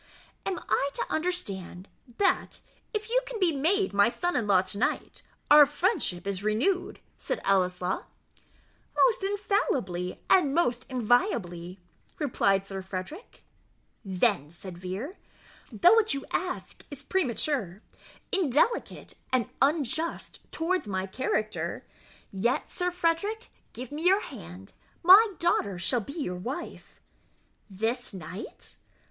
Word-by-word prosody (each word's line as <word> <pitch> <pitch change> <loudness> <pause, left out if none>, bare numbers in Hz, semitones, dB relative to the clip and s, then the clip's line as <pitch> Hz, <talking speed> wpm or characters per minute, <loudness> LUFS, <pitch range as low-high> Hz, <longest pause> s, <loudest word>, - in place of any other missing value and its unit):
"And 380 -2 -1
I 280 - +2
am - - -24
to - - -6
understand, 200 - -2 0.3
that, 395 - +1 0.3
if 430 0 -3
you - - +4
can - - -5
be 345 -5 +2
made 370 - +1
my 200 +3 +5
son 350 +8 -2
in 225 -4 0
law 190 -2 +5
to 190 +2 -4
night, - - -1 0.3
our 295 -1 +10
friendship 290 - 0
is 200 -1 -2
renewed?" 305 - 0 0.2
said - - -3
Ellieslaw. 185 -1 +1 0.9
"Most 455 -5 +4
infallibly, 305 - -1
and 300 -7 +4
most 250 -7 +1
inviolably," 200 -8 0 0.4
replied 195 -9 +1
Sir 195 -1 -5
Frederick. 190 - -7 0.6
"Then," 190 - +1
said 180 +1 -9
Vere, 195 - -5 0.5
"though 295 - +6
what 450 -9 +4
you 275 - -5
ask 360 0 -3
is 285 -1 -8
premature, 255 - -1 0.5
indelicate, 380 - +1 0.2
and 255 -4 +1
unjust 310 +3 0
towards 345 - -1
my 190 -2 -2
character, 215 0 -2 0.5
yet, 225 +6 0
Sir 360 -1 -1
Frederick, 360 +6 -1 0.2
give 255 +1 -8
me 310 +4 -1
your 385 +3 +5
hand 90 +3 -10 0.3
my 400 +4 +8
daughter 205 - +1
shall 230 +8 0
be 280 - -8
your 180 -11 -3
wife." 260 - -7 0.7
"This 225 +3 -2
night?" 185 +3 -8
255 Hz, 125 wpm, -28 LUFS, -, 0.9 s, our